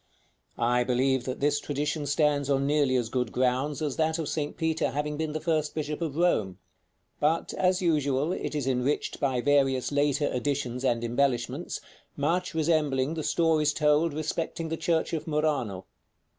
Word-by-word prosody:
I 120 +1 +2
believe 130 +1 +1
that 130 +1 -4
this 145 0 +2
tradition 145 +1 -2
stands 145 -1 +1
on 135 -1 +2
nearly 145 -2 +2
as 120 -3 +1
good 125 +1 -2
grounds 130 +4 0
as 145 -4 -2
that 160 0 +1
of 160 -3 -3
St. 150 -2 -3
Peter 160 0 0
having 150 +1 -2
been 155 0 -3
the 155 - -2
first 155 -2 -1
bishop 150 0 -3
of 155 -4 -2
Rome; 110 - +1 0.6
but, 160 +3 +1
as 185 0 +1
usual, 150 -2 +1
it 170 - -3
is 145 -3 -1
enriched 130 +2 -1
by 130 -3 0
various 135 -2 +2
later 145 0 +1
additions 125 -1 -2
and 120 -3 +1
embellishments, 125 +4 -1 0.4
much 170 +5 0
resembling 150 -3 +1
the 165 - -3
stories 155 -2 +2
told 150 +1 +2
respecting 160 +1 -3
the 165 - -1
church 165 0 0
of 160 -1 -3
Murano. 145 - -1
145 Hz, 165 wpm, -27 LUFS, 130-155 Hz, 0.6 s, I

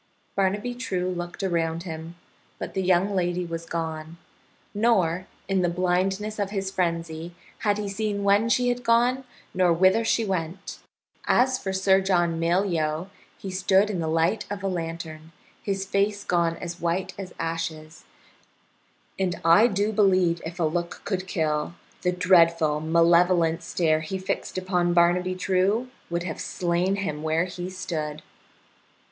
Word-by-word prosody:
Barnaby 205 +5 0
True 185 -7 -2
looked 175 +1 -5
around 165 -2 0
him, 165 -1 -7 0.4
but - - -6
the 190 - -1
young 185 +2 +2
lady 175 -1 0
was 165 0 -6
gone. 160 -1 -4 0.6
Nor, 190 -5 +2 0.2
in 195 -1 +1
the 175 - +2
blindness 190 +4 0
of 200 -1 0
his 195 -1 -3
frenzy, 170 -2 -2 0.2
had 205 -2 +1
he 210 -1 -3
seen 200 0 -2
when 200 +3 +3
she 245 +1 +3
had 245 0 -2
gone 245 +3 +2 0.3
nor 180 -1 +3
whither 185 +6 +4
she 225 0 +1
went. 185 0 -4 0.5
As 255 +1 +3
for 190 - -3
Sir 190 0 +3
John 175 -3 +1
Malyoe, 170 -1 0 0.3
he 195 - -6
stood 190 +2 +3
in 185 - -3
the 160 - -1
light 165 +6 +1
of 200 -1 -5
a - - 0
lantern, 165 -2 -5 0.3
his 195 -1 -2
face 200 +1 0
gone 170 -2 +1
as 170 0 -7
white 170 +2 -1
as 185 -2 -7
ashes, 160 -1 -4 1.2
and 185 -2 -1
I 170 +8 +7
do 205 0 0
believe 185 -5 +3
if 170 +2 -7
a - - +1
look 170 +2 -2
could 190 -2 -2
kill, 155 -1 -1 0.3
the 180 - +1
dreadful 170 -4 +4
malevolent 170 +1 +3
stare 160 -2 +1
he 160 +5 -4
fixed 185 0 -3
upon 180 -2 0
Barnaby 180 +2 +3
True 195 +6 +1 0.2
would 170 0 -2
have 165 -3 -5
slain 180 +2 0
him 155 -7 -3
where 160 +2 +1
he 180 0 -6
stood. 155 -5 -4
180 Hz, 150 wpm, -25 LUFS, 165-195 Hz, 1.2 s, I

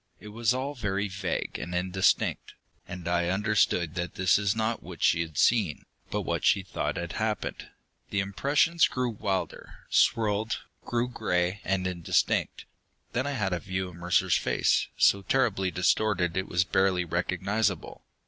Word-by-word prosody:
It 105 - -10
was 115 +1 0
all 130 +3 -2
very 100 -5 -2
vague 100 0 -3
and 90 0 -5
indistinct, 95 +1 +1 0.3
and 90 -1 -7
I 85 0 +1
understood 95 -4 +1
that 90 -1 -4
this 95 +2 +3
was 100 +1 +1
not 110 +1 -1
what 85 0 -8
she 85 -1 +4
had 80 -3 -6
seen, 105 -10 +2 0.2
but - - -1
what - - -2
she 95 - +3
thought 95 - -3
had 85 0 -4
happened. 110 -2 -3 0.4
The 100 - -1
impressions 140 - +2
grew 125 -2 -2
wilder, 100 -3 -4
swirled, 110 0 +2 0.2
grew 120 0 0
gray 90 -5 -1
and 95 -1 -1
indistinct. 90 -2 0 0.5
Then 130 +3 0
I 145 - -2
had 100 -8 -1
a 90 - -1
view 95 0 -3
of 90 - -13
Mercer's 90 +1 +2
face, - - +1
so 100 - +4
terribly 100 -5 +1
distorted 90 -1 +1
it 95 0 -1
was 90 0 +2
barely 95 -1 +1
recognizable. 90 +3 -1
95 Hz, 160 wpm, -28 LUFS, 90-110 Hz, 0.5 s, she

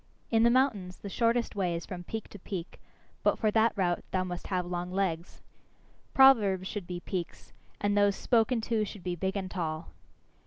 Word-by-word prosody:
In 225 -1 +4
the 235 - +6
mountains 235 -8 +1
the 200 - -8
shortest 235 +2 +1
way 180 -4 0
is 170 - -5
from 180 -2 -7
peak 220 +4 -5
to 205 - -11
peak, 180 -2 -6 0.4
but - - +2
for 215 - +1
that 225 +1 +4
route 180 -4 0
thou 185 -1 0
must 180 -1 -5
have 180 -2 -1
long 175 0 -4
legs. 180 -3 -2 0.7
Proverbs 210 -9 +5
should 200 -4 -5
be 175 -1 -5
peaks, 180 -3 -5 0.3
and 205 0 +1
those 205 -1 +4
spoken 235 +1 +2
to 220 -1 0
should 205 -2 -7
be 180 -1 -2
big 190 +3 -2
and 190 -1 -4
tall. 160 -2 -3
195 Hz, 190 wpm, -30 LUFS, 180-220 Hz, 0.7 s, the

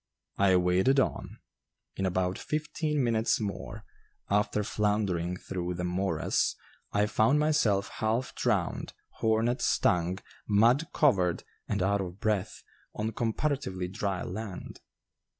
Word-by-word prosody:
I 95 -2 +5
waded 90 +10 +3
on. - - -1 0.6
In 95 - 0
about 90 0 0
fifteen 150 -1 -1
minutes 115 -1 +2
more, 100 -3 -5 0.5
after 105 +1 +2
floundering 100 -5 0
through 90 -1 -4
the 90 - -3
morass, 90 +2 0 0.4
I 105 0 +2
found 110 +6 +3
myself 150 -10 +2
half 115 +3 -1
drowned, - - -1 0.2
hornet 115 +2 +1
stung, 90 +1 +2 0.3
mud 115 +9 +4
covered, 95 - +2 0.2
and 100 -3 0
out 100 +1 +2
of 90 0 -6
breath, 105 -3 -1 0.3
on 110 +1 -2
comparatively 115 -5 -1
dry 95 -1 -2
land. 100 -1 -6
105 Hz, 115 wpm, -29 LUFS, 95-115 Hz, 0.6 s, I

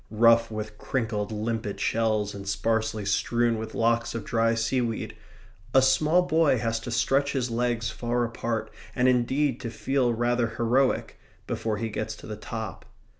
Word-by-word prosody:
Rough 115 +1 +5
with 110 -1 -6
crinkled 110 -5 -2
limpet 110 -1 -3
shells 110 -2 0
and 100 -1 -8
sparsely 110 +1 0
strewn 115 +3 +1
with 110 0 -6
locks 115 +1 +1
of 115 -3 -4
dry 115 0 +2
seaweed, 115 0 -1 0.6
a 130 - +8
small 155 +6 +4
boy 160 -5 +3
has 115 0 -1
to 115 - -7
stretch 135 +5 +1
his 125 -3 -1
legs 120 -1 0
far 120 +2 -1
apart, 115 -1 -3 0.2
and 125 0 +3
indeed 130 +2 +2
to 115 - -4
feel 130 +1 0
rather 120 -1 0
heroic, 125 +3 +1 0.3
before 110 -2 -2
he 115 +2 -2
gets - - -4
to - - -13
the - - -5
top. - - -6
115 Hz, 160 wpm, -26 LUFS, 110-125 Hz, 0.6 s, a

